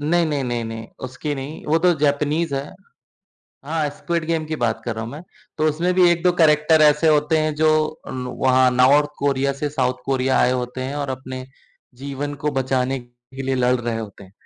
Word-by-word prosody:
नहीं, 165 Hz, +3 st, +2 dB
नहीं, 145 Hz, -3 st, -1 dB
नहीं, 120 Hz, -2 st, -2 dB
नहीं, 115 Hz, 0 st, -6 dB, 0.2 s
उसकी 145 Hz, +3 st, -4 dB
नहीं, 140 Hz, +3 st, -7 dB
वो 160 Hz, +2 st, +3 dB
तो 180 Hz, +1 st, +4 dB
जैपनीज़ 150 Hz, +1 st, +1 dB
है। 140 Hz, +2 st, -4 dB, 1.0 s
हाँ, 155 Hz, -1 st, -1 dB
स्क्विड 170 Hz, -2 st, -2 dB
गेम 165 Hz, -1 st, -1 dB
की 155 Hz, 0 st, -3 dB
बात 110 Hz, -2 st, 0 dB
कर 115 Hz, -, -2 dB
रहा 110 Hz, -, -4 dB
हूँ 115 Hz, -, -7 dB
मैं। 150 Hz, +3 st, -8 dB, 0.4 s
तो 155 Hz, -, +2 dB
उसमें 170 Hz, +4 st, 0 dB
भी 180 Hz, -1 st, +5 dB
1-2 175 Hz, +1 st, +2 dB
करैक्टर 155 Hz, 0 st, +4 dB
ऐसे 150 Hz, +1 st, +5 dB
होते 150 Hz, +2 st, +1 dB
हैं 155 Hz, -, -1 dB
जो 155 Hz, -, +5 dB, 0.5 s
नु 125 Hz, -, -5 dB
वहाँ 130 Hz, -1 st, +4 dB
नार्थ 145 Hz, +3 st, +5 dB
कोरिया 140 Hz, 0 st, +1 dB
से 150 Hz, -, 0 dB
साउथ 125 Hz, -1 st, 0 dB
कोरिया 130 Hz, -1 st, +1 dB
आए 125 Hz, -, +3 dB
होते 125 Hz, +1 st, -6 dB
हैं 145 Hz, -, -5 dB
और -, -, -7 dB
अपने 130 Hz, -1 st, -8 dB, 0.6 s
जीवन 140 Hz, +1 st, -4 dB
को 150 Hz, -, +2 dB
बचाने 130 Hz, 0 st, 0 dB
के 120 Hz, +2 st, -12 dB
लिए 135 Hz, 0 st, -1 dB
लड़ 125 Hz, +1 st, +3 dB
रहे 115 Hz, -1 st, -2 dB
होते 105 Hz, -2 st, -9 dB
हैं। 95 Hz, -, -17 dB
140 Hz, 205 wpm, -21 LUFS, 130-155 Hz, 1.0 s, भी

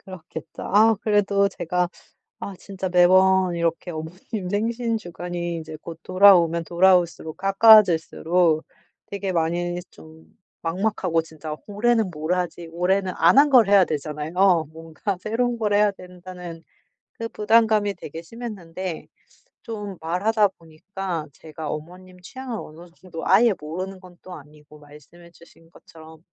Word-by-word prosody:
그렇겠죠. 175 Hz, -4 st, -10 dB
아. 220 Hz, +3 st, +4 dB
그래도 200 Hz, -2 st, +2 dB
제가 180 Hz, -1 st, -2 dB, 0.5 s
아 200 Hz, -, -7 dB
진짜 190 Hz, -1 st, -6 dB
매번 185 Hz, +1 st, +4 dB
이렇게 170 Hz, +1 st, -2 dB
어머님 180 Hz, +4 st, -6 dB
생신 230 Hz, +3 st, -1 dB
주간이 175 Hz, -2 st, -5 dB
이제 160 Hz, -1 st, -8 dB
곧 165 Hz, 0 st, -10 dB
돌아오면 180 Hz, -3 st, +5 dB
돌아올수록, 175 Hz, -2 st, +2 dB
가까워질수록 180 Hz, -5 st, +4 dB, 0.4 s
되게 200 Hz, -1 st, -4 dB
많이 175 Hz, +1 st, -1 dB
좀 160 Hz, 0 st, -16 dB, 0.4 s
막막하고 180 Hz, -1 st, -1 dB
진짜 160 Hz, -1 st, -8 dB
'올해는 220 Hz, -1 st, +1 dB
뭘 155 Hz, +2 st, -2 dB
하지?' 175 Hz, -1 st, -4 dB
올해는 185 Hz, +2 st, 0 dB
안 170 Hz, +9 st, +5 dB
한 290 Hz, +1 st, +6 dB
걸 245 Hz, -6 st, +6 dB
해야 200 Hz, -2 st, +6 dB
되잖아요. 160 Hz, +4 st, 0 dB
뭔가 165 Hz, +5 st, -5 dB
새로운 235 Hz, +4 st, -1 dB
걸 210 Hz, -2 st, 0 dB
해야 210 Hz, 0 st, +4 dB
된다는 180 Hz, -3 st, -11 dB, 0.5 s
그 230 Hz, -, -6 dB
부담감이 215 Hz, -2 st, +2 dB
되게 165 Hz, -1 st, -9 dB
심했는데 185 Hz, -5 st, -7 dB, 0.6 s
좀 205 Hz, -4 st, -7 dB
말하다 200 Hz, +6 st, +1 dB
보니까 170 Hz, +1 st, -6 dB
제가 155 Hz, +1 st, -9 dB
어머님 180 Hz, +4 st, -9 dB
취향을 255 Hz, +5 st, -7 dB
어느 165 Hz, +3 st, -14 dB
정도 170 Hz, -3 st, -8 dB
아예 220 Hz, +4 st, +5 dB
모르는 185 Hz, +5 st, -6 dB
건 180 Hz, -1 st, -16 dB
또 185 Hz, -1 st, -10 dB
아니고, 150 Hz, 0 st, -15 dB
말씀해 150 Hz, +4 st, -17 dB
주신 165 Hz, 0 st, -20 dB
것처럼. 160 Hz, -1 st, -16 dB
180 Hz, 300 characters per minute, -23 LUFS, 165-200 Hz, 0.6 s, 한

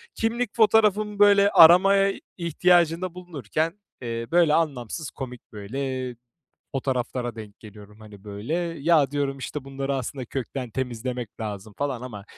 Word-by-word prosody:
Kimlik 230 Hz, 0 st, -2 dB
fotoğrafımı, 210 Hz, -2 st, +3 dB
böyle, 200 Hz, -1 st, +6 dB
aramaya 195 Hz, +4 st, +6 dB, 0.2 s
ihtiyacında 175 Hz, +1 st, +2 dB
bulunurken, 165 Hz, -, -4 dB, 0.2 s
eee, 115 Hz, -1 st, -4 dB
böyle, 170 Hz, -3 st, +4 dB
anlamsız 145 Hz, -2 st, -2 dB
komik, 125 Hz, -3 st, -8 dB
böyle, 130 Hz, +5 st, -4 dB
eee, 120 Hz, -, -10 dB, 0.6 s
fotoğraflara 125 Hz, -3 st, -2 dB
denk 105 Hz, -2 st, -10 dB
geliyorum, 105 Hz, 0 st, -14 dB
hani, 105 Hz, -2 st, -14 dB
böyle. 105 Hz, +9 st, -5 dB, 0.3 s
"Ya" 150 Hz, -3 st, +3 dB
diyorum, 140 Hz, -1 st, -2 dB
işte, 135 Hz, +1 st, -6 dB
"Bunları 135 Hz, 0 st, -3 dB
aslında 130 Hz, 0 st, -5 dB
kökten 130 Hz, 0 st, -5 dB
temizlemek 125 Hz, -1 st, -5 dB
lazım," 105 Hz, -1 st, -6 dB
falan 135 Hz, -4 st, -2 dB
ama 105 Hz, -6 st, -8 dB
135 Hz, 130 wpm, -25 LUFS, 120-170 Hz, 0.6 s, böyle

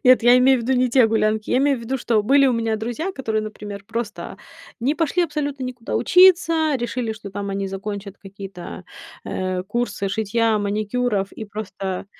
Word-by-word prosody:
Нет, 255 Hz, -1 st, +6 dB
я 240 Hz, +1 st, +7 dB
имею 260 Hz, +1 st, +5 dB
в 235 Hz, -, -4 dB
виду 260 Hz, +3 st, +1 dB
не 255 Hz, -, +2 dB
те 245 Hz, -1 st, +5 dB
гулянки. 215 Hz, -1 st, 0 dB
Я -, -, +3 dB
имею 275 Hz, -1 st, +2 dB
в -, -, -10 dB
виду, 255 Hz, +4 st, -3 dB
что 230 Hz, -3 st, +1 dB
были 275 Hz, +5 st, +4 dB
у 255 Hz, -, +3 dB
меня 225 Hz, -2 st, 0 dB
друзья, 240 Hz, -, -3 dB
которые, 220 Hz, -7 st, -2 dB
например, 205 Hz, -2 st, -8 dB
просто 230 Hz, -1 st, -5 dB, 0.4 s
не 275 Hz, +6 st, +1 dB
пошли 335 Hz, +2 st, +1 dB
абсолютно 290 Hz, -4 st, -3 dB
никуда 245 Hz, -2 st, -4 dB
учиться, 335 Hz, -4 st, +5 dB
решили, 240 Hz, -2 st, -3 dB
что 210 Hz, -2 st, -9 dB
там 200 Hz, +1 st, -5 dB
они 195 Hz, 0 st, -2 dB
закончат 200 Hz, 0 st, -6 dB
какие-то, 195 Hz, -2 st, -9 dB, 0.4 s
э, 185 Hz, -1 st, -2 dB
курсы 205 Hz, 0 st, -2 dB
шитья, 220 Hz, +2 st, +1 dB
маникюров 205 Hz, 0 st, -1 dB
и 220 Hz, -, -7 dB
просто. 195 Hz, -3 st, -5 dB
225 Hz, 180 wpm, -22 LUFS, 205-255 Hz, 0.4 s, я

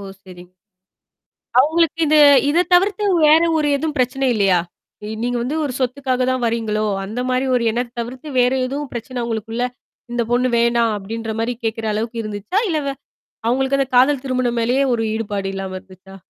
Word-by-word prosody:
ஓ! -, -, -9 dB, 0.2 s
சரிங் 180 Hz, -1 st, -13 dB, 1.1 s
அவங்களுக்கு 325 Hz, +4 st, +3 dB
இது 305 Hz, +1 st, +4 dB, 0.3 s
இத 340 Hz, +4 st, +3 dB
தவிர்த்து, 395 Hz, +3 st, +2 dB, 0.2 s
வேற 310 Hz, +2 st, +6 dB
ஒரு 300 Hz, -2 st, +1 dB
எதுவும் 310 Hz, +1 st, -3 dB
பிரச்சனை 255 Hz, +2 st, 0 dB
இல்லையா? 195 Hz, -4 st, +3 dB, 0.6 s
நீங்க 245 Hz, +1 st, -1 dB
வந்து 280 Hz, +6 st, -2 dB
ஒரு 275 Hz, -, -3 dB
சொத்துக்காக 255 Hz, 0 st, -1 dB
தான் 255 Hz, -1 st, -1 dB
வரீங்களோ! 220 Hz, -2 st, -1 dB, 0.2 s
அந்த 220 Hz, +5 st, -5 dB
மாரி 255 Hz, +1 st, 0 dB
ஒரு 235 Hz, -, 0 dB
எண்ணம் 240 Hz, +1 st, -3 dB
தவிர்த்து, 250 Hz, +5 st, -7 dB
வேறு 250 Hz, +1 st, +3 dB
எதுவும் 280 Hz, +2 st, -5 dB
பிரச்சனை 240 Hz, +1 st, -5 dB
உங்களுக்குள்ள, 225 Hz, +1 st, -3 dB, 0.5 s
"இந்த 240 Hz, -, 0 dB
பொண்ணு 250 Hz, +1 st, +2 dB
வேணாம்." 235 Hz, -1 st, +2 dB
அப்டின்ற 220 Hz, +2 st, -5 dB
மாரி 240 Hz, +2 st, -1 dB
கேட்கற 225 Hz, 0 st, -2 dB
அளவுக்கு 230 Hz, +2 st, -3 dB
இருந்துச்சா? 210 Hz, -, -3 dB
இல்ல 315 Hz, -3 st, 0 dB
வே 275 Hz, -, -2 dB, 0.5 s
அவங்களுக்கு 265 Hz, +3 st, +1 dB
அந்த 270 Hz, -, +1 dB
காதல் 265 Hz, +2 st, +4 dB
திருமணம் 250 Hz, -2 st, -1 dB
மேலேயே 250 Hz, +4 st, +2 dB
ஒரு 225 Hz, -, 0 dB
ஈடுபாடு 205 Hz, -3 st, -3 dB
இல்லாம 190 Hz, -1 st, -5 dB
இருந்துச்சா? 190 Hz, 0 st, -16 dB
245 Hz, 165 wpm, -19 LUFS, 225-270 Hz, 1.1 s, வேற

